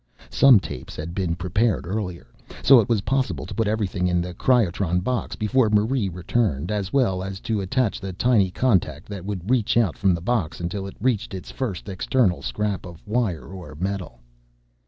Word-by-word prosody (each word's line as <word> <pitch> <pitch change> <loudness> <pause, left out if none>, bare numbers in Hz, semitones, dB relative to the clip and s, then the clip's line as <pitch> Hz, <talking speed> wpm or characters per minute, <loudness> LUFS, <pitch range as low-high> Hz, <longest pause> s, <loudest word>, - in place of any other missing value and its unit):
Some 135 -6 +7
tapes 65 - -8
had 80 +2 -6
been 90 -3 -1
prepared 95 +5 0
earlier, 90 -2 -4 0.4
so 135 -1 +8
it 110 - 0
was 115 -4 +2
possible 135 +4 -1
to - - -7
put 115 -2 0
everything 100 -4 0
in 90 -1 +1
the 90 +1 -3
cryotron 95 -7 +2
box 125 +6 -2
before 115 +2 +2
Marie 105 +1 +2
returned, 90 - -1
as 100 -3 -2
well 115 -10 +2
as 95 0 -5
to 110 -3 -1
attach 110 +3 0
the 95 -1 -4
tiny 100 0 +2
contact 90 - 0
that 100 -3 -6
would 95 -3 -4
reach 120 -3 +2
out 110 -8 +2
from 95 -2 +3
the - - -4
box 95 -3 -1
until 95 +3 -3
it 95 - -10
reached 110 -4 0
its 95 - -8
first 105 -10 -4
external 100 +1 +1
scrap 105 -2 -2
of 85 -3 -11
wire 105 -7 -1
or 90 -5 -9
metal. 95 -5 -4
100 Hz, 185 wpm, -23 LUFS, 90-115 Hz, 0.4 s, so